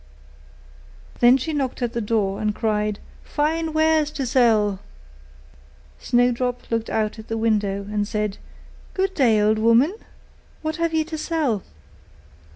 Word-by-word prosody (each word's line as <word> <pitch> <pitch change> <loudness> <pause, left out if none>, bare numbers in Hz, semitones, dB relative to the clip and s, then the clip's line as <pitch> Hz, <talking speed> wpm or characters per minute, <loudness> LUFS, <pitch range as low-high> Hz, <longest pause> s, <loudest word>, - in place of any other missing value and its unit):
Then 245 +2 +6
she 310 +5 -4
knocked 265 -3 -2
at 240 -1 -2
the 235 - -2
door, 205 -3 -1
and 210 -1 0
cried, 210 -2 -1 0.3
'Fine 320 +2 -1
wares 315 -1 +2
to 280 -3 -4
sell!' 220 -6 +3 1.2
Snowdrop 245 0 0
looked 230 0 -1
out 220 0 -1
at 220 - -10
the 225 - -3
window, 210 -3 0
and 205 0 -2
said, 210 -2 -2 0.6
'Good 385 0 0
day, 240 - +3
good 215 +1 +2
woman! 230 - +4 0.7
what 315 +1 -2
have 335 -1 0
you 315 - +2
to 315 -1 -6
sell? 300 - -1
235 Hz, 140 wpm, -22 LUFS, 215-300 Hz, 1.2 s, Then